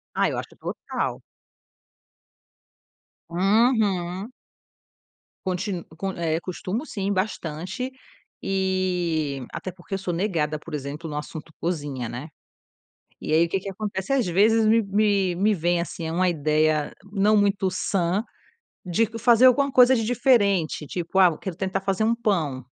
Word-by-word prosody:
Ah, - - +2
eu - - -3
acho - - -4
que - - -19
é - - -33
total. - - -4 2.1
Uhum. 195 0 +1 1.1
Contin 185 -1 -2 0.3
eh, 165 -1 0
costumo 190 - -4
sim 200 -8 -3
bastante, 185 +4 -3 0.5
e 180 -7 0
até 185 - -5
porque 185 +2 -7
eu - - -1
sou 185 -2 -3
negada, 165 -5 -1
por 160 0 -11
exemplo, 150 +3 -5
no 150 - -4
assunto 155 +2 -7
cozinha, 145 -8 -3
né. 125 +5 -6 0.9
E - - -3
aí 160 +2 +5
o - - -9
que 195 - -1
que 195 +1 -6
acontece 200 +3 -4
às 255 -7 +2
vezes 215 +5 +4
me 225 +1 +4
me 200 -2 +1
me 210 +3 +3
vem, 175 0 +1
assim, 170 -1 -5
eh, 160 - -3
uma 185 +2 +2
ideia 155 -1 +1 0.2
não 210 +1 +3
muito 200 -2 +2
sã, 185 +1 0 0.6
de 200 +6 +1
fazer 240 +1 +5
alguma 275 +2 +3
coisa 255 0 +6
de 225 - 0
diferente, 205 - +2
tipo: 175 +3 -2
"Ah, 180 -4 +6
quero 190 -4 -6
tentar 190 +1 -2
fazer 195 +1 0
um 230 +2 +2
pão". 165 - -1
185 Hz, 150 wpm, -24 LUFS, 165-210 Hz, 2.1 s, coisa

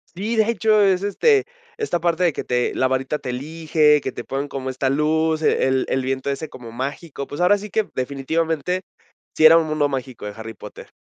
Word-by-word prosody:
Sí, 210 +6 -2
de 220 - +4
hecho, 215 -1 +3
es, 190 -1 +2
este, 410 - +3 0.3
esta 435 - -1
parte 170 +1 +1
de 170 - +2
que - - -4
te 125 0 -1
la 130 - +2
varita 130 +3 -1
te 130 - -7
elige, 150 +2 +2
que 130 - -3
te 120 - -8
ponen 140 +2 -3
como 130 -1 -4
esta 130 +1 -1
luz, 155 +3 +1
eh, 155 - +2
el 130 0 +1
el 135 - 0
viento 130 +1 -2
ese 140 +3 -3
como 115 -4 -11
mágico. 140 +3 -5
Pues, 145 - -7
ahora 180 +3 +4
sí 210 +1 -8
que, 215 +1 0
definitivamente, 160 +6 -1 0.5
sí 155 - +2
era 160 +1 +9
un 165 - 0
mundo 155 -1 +1
mágico 130 -4 -5
de 105 - -4
Harry 110 0 -8
Potter. - - -12
150 Hz, 215 wpm, -21 LUFS, 130-170 Hz, 0.5 s, era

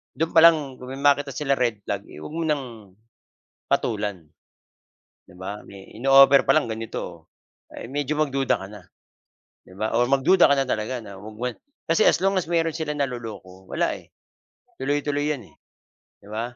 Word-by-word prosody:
do'n 160 +4 -1
pa 165 - +6
lang 170 0 +8 0.2
'pag 125 0 -9
may 140 - -8
makita 145 0 +3
sila 140 -3 0
red 115 -5 0
flag, 100 0 -4
eh, 75 - -11
huwag - - -8
mo 165 - -1
ng 150 -3 0 1.0
patulan, 105 -5 -1 1.0
'di 90 - -18
ba? 95 +3 -6
May 100 -1 -13
in-o-offer 135 +1 +6
pa - - +5
lang 145 -7 +1
ganito. 110 -7 -6 0.5
Oo - - -8
medyo 145 +1 -2
magduda 135 -7 0
ka - - -6
na, 105 -4 -12 0.8
'di 95 - -15
ba? 110 +2 -2
Oo 120 +2 +2
mag-duda 155 +7 +5
ka 140 - +4
na 135 - +1
talaga 115 +1 -2
na 100 -2 -10 0.7
kasi 165 - +2
as - - +5
long 195 +2 +1
as 185 -4 -1
meron 165 -2 +1
silang 150 -2 -3
naloloko 110 -9 -6
wala, - - 0
eh, - - -11 0.7
tuloy-tuloy 145 +1 -1
'yan, 125 - -13
eh, - - -27 0.7
'di 100 - -15
ba? 120 +2 -4
135 Hz, 175 wpm, -24 LUFS, 105-145 Hz, 1.0 s, lang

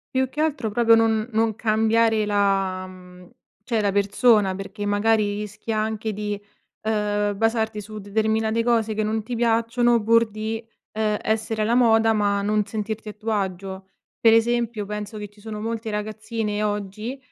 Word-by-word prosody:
Più 260 0 +2
che 295 +4 -4
altro 280 -7 0
proprio 230 +1 +4
non 225 -1 +2
non 220 -1 +1
cambiare 220 0 +2
la 195 -2 +1 0.8
cioè 230 0 -1
la 200 -2 +1
persona 205 0 +3
perché 195 +2 -6
magari 205 0 +2
rischi 210 +2 -6
anche 220 0 -1
di, 210 0 -3 0.4
uhm, 210 -1 0
basarti 220 0 0
su 215 +1 -8
determinate 220 +2 0
cose 230 -2 +1
che 215 0 -1
non 215 +1 -1
ti 240 +2 -4
piacciono 235 0 +2
pur 230 +1 +4
di, 220 +1 -4 0.3
ehm, 215 -1 0
essere 220 0 -1
alla 225 +3 +2
moda 225 -2 +4
ma 205 -2 +1
non 210 +1 +1
sentirti 220 +1 -5
a 210 - -5
tuo 220 +2 -4
agio. 190 -1 -3 0.3
Pre 225 -1 +6
esempio 230 -2 +1
penso 210 +1 -5
che 205 -1 -6
ci 205 +1 -23
sono 215 0 -7
molte 225 0 -3
ragazzine 215 0 -3
oggi, 210 +4 -3
215 Hz, 160 wpm, -23 LUFS, 205-225 Hz, 0.8 s, Pre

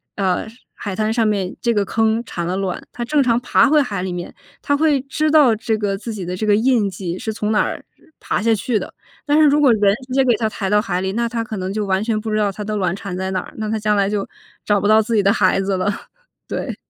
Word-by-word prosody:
呃， 190 +1 0 0.3
海 200 -3 -5
滩 215 0 0
上 225 -1 +2
面， 195 -3 -1
这 235 - +1
个 205 -2 +1
坑 225 +2 +1
产 175 -5 -4
了 185 +2 -1
卵， 190 -2 -3
它 240 - -5
正 290 +3 +2
常 235 -1 +2
爬 260 +2 +3
回 305 - +5
海 205 -8 -3
里 185 - -3
面， 175 0 -6 0.3
它 285 - +1
会 300 -2 +3
知 305 +3 -1
道 280 -8 +5
这 220 0 -1
个 205 -2 -1
自 225 +3 -6
己 195 -4 -5
的 180 +1 -4
这 215 - -2
个 205 - +5
印 230 -2 +2
迹 180 -1 -5
是 220 - -3
从 210 0 -2
哪 210 - +3
儿 - - -5
呃 - - -27 0.2
爬 - - -2
下 225 +1 +3
去 220 +1 -1
的。 - - -8 0.3
但 295 +1 +3
是 310 - +6
如 295 +1 +3
果 270 -4 +6
人 205 -1 +3
直 255 - -6
接 270 - +3
给 240 -3 +4
它 220 -2 0
抬 195 -3 -3
到 210 0 +3
海 180 -3 -2
里， 190 0 -2
那 235 +2 -1
它 230 -1 -2
可 220 -1 -6
能 185 +1 -3
就 210 -1 -2
完 190 +1 0
全 220 -1 0
不 220 - -5
知 - - 0
道 205 -2 +1
它 210 - -9
的 215 +1 -3
卵 185 -4 0
产 195 -2 -6
在 190 0 -3
哪 185 - 0
儿， - - -13
那 215 -1 -3
它 220 - -1
将 210 0 +1
来 200 0 +2
就 205 -1 -2 0.4
找 205 -1 +2
不 - - -3
到 215 +1 +6
自 225 +1 -2
己 205 - +3
的 200 - +4
孩 195 - +2
子 195 0 -1
了。 195 +3 0 0.6
对。 - - -4
215 Hz, 305 characters per minute, -19 LUFS, 195-235 Hz, 0.6 s, 是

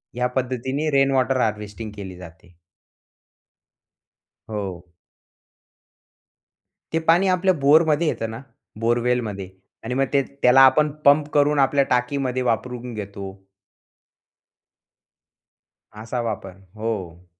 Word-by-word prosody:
या 125 0 0
पद्धतीने 130 +4 -2
rain 135 0 +4
water 130 -1 +1
harvesting 105 0 -3
केली 95 -3 -8
जाते. 90 0 -14 2.0
हो. 95 -5 -5 2.1
ते 165 - +2
पाणी 175 +4 +4
आपल्या 185 0 +2
बोरमध्ये 155 +2 +4
येतं 115 -6 -2
ना, 115 - -8 0.4
बोरवेलमध्ये 115 -4 -1 0.3
आणि 120 +2 -4
मग 135 +1 +1
ते 140 - +4 0.2
त्याला 125 +2 +6
आपण 140 +3 +5 0.2
पंप 145 +1 +5
करून 145 0 +3
आपल्या 140 +1 +3
टाकीमध्ये 130 +1 0
वापरून 125 0 -2
घेतो. 100 -2 -8 2.5
असा 110 +3 -5
वापर, 95 -5 -5 0.2
हो. 95 -6 -5
125 Hz, 100 wpm, -22 LUFS, 105-140 Hz, 2.5 s, त्याला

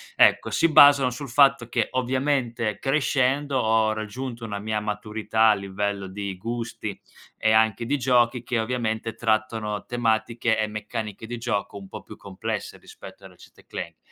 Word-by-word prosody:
ecco, - - +4
si 165 - +2
basano 140 -3 +7
sul 130 +2 -7
fatto 135 -2 +4
che 120 -3 0
ovviamente 130 -4 -1
crescendo 135 0 +1
ho 110 -1 +2
raggiunto 115 +3 -6
una 105 -2 -4
mia 110 +1 -2
maturità 105 +1 0
a - - +6
livello 100 0 -3
di 100 0 -5
gusti 115 -1 -5 0.4
e 110 - +2
anche 110 +1 +3
di 145 +3 0
giochi 125 -1 +2
che 120 0 -2
ovviamente 115 -1 -2
trattano 110 -1 -1
tematiche 115 -1 0
e 110 - +1
meccaniche 105 0 -6
di 120 0 -5
gioco 105 -4 -3
un 100 -1 -10
po' - - -9
più - - -12
complesse 105 +2 -5
rispetto - - -13
a - - -9
Ratchet& - - -19
Clank. - - -7
115 Hz, 155 wpm, -24 LUFS, 105-125 Hz, 0.4 s, basano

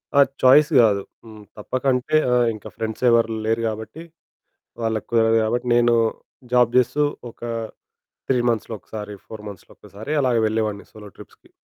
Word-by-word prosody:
ఆ! - - +5 0.2
చాయిస్ 140 +4 +6
గాదు. 105 -3 +3 0.2
హ్మ్, 110 -2 -13
తప్పకంటే 130 +5 -1 0.2
ఆ! - - +3 0.2
ఇంక 110 - -12
ఫ్రెండ్స్ 110 +1 -5
ఎవరు 115 -1 +3
లేరు 115 +1 0
గాబట్టి, 110 +8 -6 0.8
వాళ్ళకి 110 -2 -2
కుదరదు 115 -1 +3
గాబట్టి, 120 +3 -1
నేను 120 0 +4 0.6
జాబ్ 125 -2 +4
చేస్తూ, 150 +4 +1 0.3
ఒక - - -24 0.9
3 130 - +3
మంత్స్‌లో 115 -1 -2
ఒకసారి, 105 +1 -8
4 110 -1 -10
మంత్స్‌లో 100 -4 -13
ఒక్కసారి 110 +8 -9
అలాగ 125 -3 +1
వెళ్ళేవాడిని 110 -2 -2
సోలో 105 -1 -12
ట్రిప్స్‌కి. - - -16
115 Hz, 145 wpm, -22 LUFS, 110-125 Hz, 0.9 s, చాయిస్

